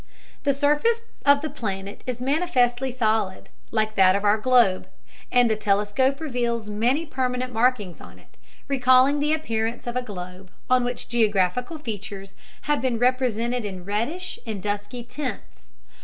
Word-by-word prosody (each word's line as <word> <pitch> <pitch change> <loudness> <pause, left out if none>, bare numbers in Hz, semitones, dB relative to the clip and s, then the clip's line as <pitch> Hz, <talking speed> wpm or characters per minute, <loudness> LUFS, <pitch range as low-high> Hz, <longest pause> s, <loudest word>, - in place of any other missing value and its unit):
The 280 - +3
surface 295 +12 +2 0.3
of 285 0 +6
the 310 - -3
planet 200 -7 -5
is 250 -2 -3
manifestly 265 -3 +1
solid, 220 -6 -1 0.2
like 215 -1 0
that 190 -2 +5
of 200 - -1
our 210 +1 +3
globe, 235 -5 +3 0.4
and 245 -1 +5
the 220 - +1
telescope 210 +6 +1
reveals 240 -7 -2
many 245 +10 +1
permanent 255 -3 -2
markings 225 -6 +1
on - - -13
it, - - -23 0.3
recalling 260 +1 +4
the 295 +1 +1
appearance 230 -7 -1
of 240 0 -4
a 250 - +1
globe 185 -4 -8 0.2
on 255 -1 +5
which 245 0 -4
geographical 225 - +1
features 200 -6 -7 0.3
have 295 -5 0
been 250 -2 0
represented 245 -1 +1
in 190 -3 -6
reddish 275 - -3
and 210 -4 -4
dusky 205 +4 -3
tints. 260 +2 -7
240 Hz, 150 wpm, -24 LUFS, 210-260 Hz, 0.4 s, of